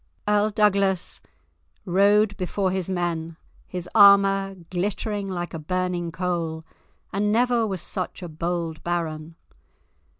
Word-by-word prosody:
Earl 210 0 +3
Douglas 200 -3 +1 0.6
rode 205 +3 +3
before 190 0 -1
his 190 -1 -2
men, 165 -3 -2 0.3
his 180 -1 -5
armour 195 -1 +6 0.2
glittering 200 +2 -2
like 175 -2 -4
a 165 - -4
burning 180 +1 -2
coal, 165 -2 -3 0.5
and 205 +1 +1
never 235 0 +2
was 190 -4 -3
such 185 0 -4
a - - -4
bold 165 0 -3
baron. 165 -2 -3
185 Hz, 120 wpm, -24 LUFS, 170-200 Hz, 0.6 s, armour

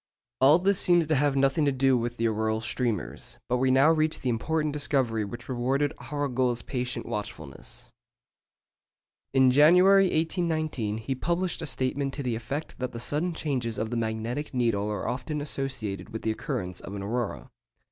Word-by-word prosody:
All 140 +4 +7
this 195 +2 +2
seems 175 -2 +4
to 155 +1 +1
have 145 0 +2
nothing 135 +3 +2
to 140 - +3
do 135 0 +3
with 120 0 -2
the 115 - +1
auroral 110 0 0
streamers; 115 -3 -3
but 125 - +1
we 130 +1 +2
now 135 +4 +5
reach 155 -1 +1
the 130 - -1
important 150 +6 -1
discovery 130 -7 +1
which 120 +4 -8
rewarded 135 +4 0 0.2
Arago's 130 -4 0
patient 125 -2 -3
watchfulness. 100 - -7 1.4
In 130 -1 +5
January 180 +8 +6
1819 155 - -1
he 115 +5 -3
published 175 +6 -1
a 160 - -3
statement 135 +1 -1
to 140 - -4
the 125 -2 -1
effect 135 +7 -5
that 125 0 -3
the 115 - -5
sudden 155 +8 -1
changes 125 -8 -2
of 110 +1 -3
the - - -2
magnetic 115 +5 -3
needle 110 -4 +1
are 105 -3 -3
often 140 +4 -3
associated 130 -10 -4
with 110 - -6
the 110 - +1
occurrence 90 -4 -4
of 100 - -8
an 100 - -5
aurora. 115 +2 -3
130 Hz, 170 wpm, -27 LUFS, 115-150 Hz, 1.4 s, All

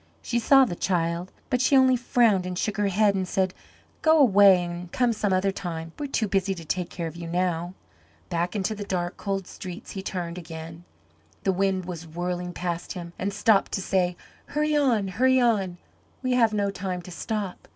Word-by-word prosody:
She 240 - 0
saw 270 +3 +6
the 215 - -4
child, 170 0 -1 0.2
but 250 - +2
she 270 +1 +4
only 260 -1 +5
frowned 230 -6 +2
and 180 -1 -4
shook 215 +3 -1
her 205 -1 +2
head 200 +1 +3
and 190 -1 -1
said, 190 -1 0 0.5
"Go 315 0 +5
away 200 - +6
and 175 0 -7
come 245 -2 +2
some 210 -2 -1
other 190 +1 +2
time. 165 -3 -5
We 295 - -2
are - - -18
too 220 -5 0
busy 195 0 0
to 165 -2 -9
take 180 +2 -2
care 170 - -5
of 160 0 -6
you 170 -1 -7
now." 175 0 -1 0.5
Back 175 +2 -2
into 205 +1 0
the 210 -1 -5
dark, 175 -3 -2
cold 195 -2 -3
streets 180 0 -8
he 195 - -5
turned 180 -2 -4
again. 165 0 -9 0.6
The 190 - +2
wind 190 -1 0
was 170 -2 -7
whirling 175 +2 -3
past 175 -1 -4
him 175 -2 -8
and 195 +2 -1
seemed 205 0 +3
to - - -1
say, 180 -2 0 0.3
"Hurry 300 +1 0
on, 245 -9 +2
hurry 260 +7 +3
on, 200 -7 +1 0.5
we 255 - 0
have 230 -3 +4
no 200 -2 0
time 185 -2 -4
to 180 - -10
stop. 200 +1 -4
190 Hz, 205 wpm, -26 LUFS, 175-215 Hz, 0.6 s, saw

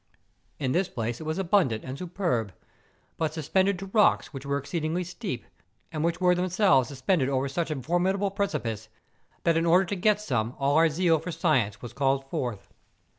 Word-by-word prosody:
In 135 -3 -1
this 180 +6 +1
place 115 +2 -3
it - - -7
was 155 +2 -2
abundant 175 - +2
and 130 0 -6
superb, 165 - -2 0.6
but 160 -1 -1
suspended 190 +5 +1
to 195 - -6
rocks 210 -6 +3
which 135 0 -7
were 140 0 +1
exceedingly 155 +4 -2
steep, 175 - -5 0.5
and 155 -1 -2
which 170 +1 0
were 180 -1 +4
themselves 180 - +3
suspended 135 +2 0
over 135 0 0
such 165 +5 -2
a 155 -3 -2
formidable 190 - +1
precipice, 130 - -3 0.5
that 165 -1 +3
in 165 - +1
order 180 +3 +5
to 200 - -3
get 210 +3 +2
some 125 - -2
all 140 +1 +1
our 165 +1 +5
zeal 165 0 +2
for 180 +3 -5
science 135 - 0
was 120 - -7
called 135 -1 0
forth. 120 -6 -3
160 Hz, 180 wpm, -27 LUFS, 135-180 Hz, 0.6 s, order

